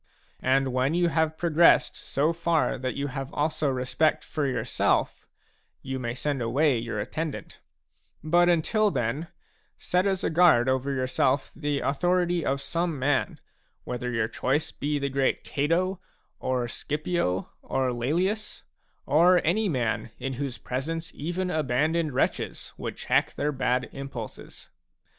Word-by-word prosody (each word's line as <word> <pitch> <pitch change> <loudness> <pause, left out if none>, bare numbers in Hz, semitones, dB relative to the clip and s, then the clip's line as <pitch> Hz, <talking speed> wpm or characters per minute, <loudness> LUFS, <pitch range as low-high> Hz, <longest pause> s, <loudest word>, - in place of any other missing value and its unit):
And 130 0 +2
when 130 +5 +1
you 175 -1 +3
have 160 0 0
progressed 165 -4 +4
so 150 +4 0
far 170 -5 +1
that 130 0 -3
you 140 - -2
have 135 -1 -5
also 155 0 0
respect 130 +4 +1
for 150 -3 -2
yourself, 125 -4 0 0.6
you 130 0 -4
may 120 -1 -3
send 140 0 -2
away 130 +3 +2
your 115 -2 -4
attendant; 155 +8 -5 0.6
but 175 +3 +4
until 210 +6 +3
then, 140 - -2 0.5
set 180 +2 +1
as 190 -2 0
a - - 0
guard 160 -8 +5
over 130 +1 +1
yourself 130 +1 +1
the 145 -2 -1
authority 175 +4 +1
of 135 0 0
some 165 +1 -2
man, 135 +1 0 0.4
whether 125 0 -4
your 115 -2 0
choice 135 +6 -1
be 145 +1 -2
the 140 -1 -1
great 135 0 0
Cato, 175 +6 0 0.4
orScipio, 130 - -1
or 130 -1 0
Laelius, 175 - -1 0.2
— - - -43
or 175 +6 +5
any 205 +5 +2
man 120 -7 -1
in 135 - -3
whose 130 -1 -4
presence 165 +6 -4
even 175 +4 -3
abandoned 155 +2 +1
wretches - - -1
would - - -6
check - - +1
their 150 - 0
bad 125 -2 0
impulses. 135 -5 -8
145 Hz, 140 wpm, -27 LUFS, 130-165 Hz, 0.6 s, guard